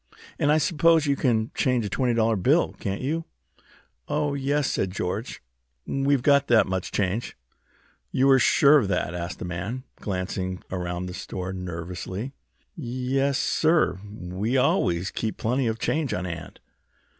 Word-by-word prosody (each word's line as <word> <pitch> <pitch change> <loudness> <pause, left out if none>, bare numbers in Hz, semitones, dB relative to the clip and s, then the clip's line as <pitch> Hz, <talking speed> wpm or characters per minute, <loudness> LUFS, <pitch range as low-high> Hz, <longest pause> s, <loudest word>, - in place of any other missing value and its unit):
"And 145 - +3
I 155 - +5
suppose 160 +1 +3
you 140 -1 +2
can 115 -5 +1
change 125 -4 +1
a - - -3
twenty 125 +3 +1
dollar 115 0 +3
bill, 95 - +2
can't 100 0 -3
you?" 160 +4 -1 0.8
"Oh, 150 -1 0
yes," 140 +1 0
said 95 - 0
George. 95 - -4 0.4
"We've 135 -1 +1
got 140 -1 +4
that 120 -2 +5
much 95 -1 -3
change." 100 +4 -1 0.7
"You 130 - +2
were 135 -1 +6
sure 145 +4 +6
of 110 - -1
that?" 90 -3 -1
asked 85 0 -4
the - - -6
man, 100 +9 -4
glancing 95 -1 -3
around 90 -1 -3
the 90 - -6
store 95 0 -5
nervously. 90 +6 -5 0.4
"Yes, 130 0 -1
sir, 155 - +2
we 100 +3 -3
always 90 -7 +2
keep 110 - -3
plenty 125 +3 0
of 110 0 -1
change 150 +2 -1
on 90 - -3
hand." 85 -3 -7
115 Hz, 155 wpm, -25 LUFS, 90-140 Hz, 0.8 s, were